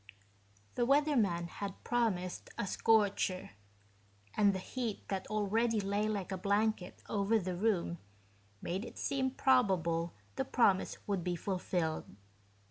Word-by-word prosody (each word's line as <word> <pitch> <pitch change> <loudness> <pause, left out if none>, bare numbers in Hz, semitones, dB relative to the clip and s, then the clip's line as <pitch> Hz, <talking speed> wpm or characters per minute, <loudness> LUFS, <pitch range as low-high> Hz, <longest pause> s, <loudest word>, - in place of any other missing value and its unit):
The 245 - 0
weatherman 250 - +3
had 200 +2 -6
promised 210 -7 -1
a - - -1
scorcher, 200 -3 +2 0.8
and 205 -1 +5
the 190 - -2
heat 225 +3 -4
that 195 -1 -2
already 215 +2 +1
lay 200 +1 0
like 200 -3 -3
a 190 - -3
blanket 205 -1 0
over 210 +2 +2
the 185 -3 -2
room 175 -4 0 0.6
made 185 +4 -2
it 240 - -9
seem 265 -1 0
probable 185 - +2 0.2
the - - +1
promise 200 -6 +2
would 195 -4 -1
be 180 0 -1
fulfilled. 175 -3 -1
200 Hz, 130 wpm, -34 LUFS, 185-225 Hz, 0.8 s, and